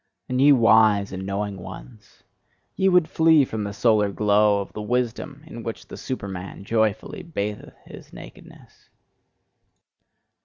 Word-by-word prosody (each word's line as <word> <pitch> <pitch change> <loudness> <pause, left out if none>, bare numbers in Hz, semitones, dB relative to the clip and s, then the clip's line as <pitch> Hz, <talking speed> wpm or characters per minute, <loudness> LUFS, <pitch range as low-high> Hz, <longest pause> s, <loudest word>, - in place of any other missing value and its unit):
And 125 +1 -1
ye 145 +1 +7
wise 110 -5 +4
and 95 0 -6
knowing 100 0 -3
ones, 95 +4 -12 0.5
ye 190 - +2
would 180 -3 +4
flee 160 -3 +4
from 110 -3 -4
the 100 - -4
solar 105 -1 +2
glow 105 0 +2
of 100 - -7
the 105 - -6
wisdom 125 +6 -3
in 120 -7 -9
which 115 -1 -7
the - - -8
Superman 95 -7 -6
joyfully 110 - -1
batheth 105 - -5
his - - -13
nakedness! - - -15
110 Hz, 140 wpm, -23 LUFS, 100-130 Hz, 0.5 s, ye